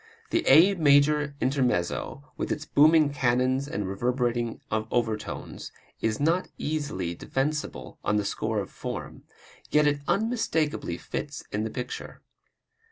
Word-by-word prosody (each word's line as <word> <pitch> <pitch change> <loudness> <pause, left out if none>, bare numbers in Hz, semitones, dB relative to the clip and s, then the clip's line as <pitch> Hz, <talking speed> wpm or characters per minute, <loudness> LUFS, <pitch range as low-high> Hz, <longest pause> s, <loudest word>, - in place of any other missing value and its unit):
The 340 - +2
A 165 +8 +7
major 150 -2 +3
intermezzo, 130 -1 0
with - - -3
its 150 - -2
booming 155 0 +5
cannons 130 +1 +1
and 105 -8 -3
reverberating 120 +3 -1
overtones, 110 0 -2 0.3
is 110 -1 0
not 165 +5 +2
easily 145 - -2
defensible 145 - -3
on 105 - +1
the 105 -1 +1
score 110 +2 -2
of 100 - -3
form, - - -6 0.4
yet 150 0 +4
it 145 -1 +2
unmistakably 165 - 0
fits 145 +8 -5
in 105 +1 -1
the - - -2
picture. 125 +2 -6
135 Hz, 125 wpm, -27 LUFS, 110-150 Hz, 0.4 s, A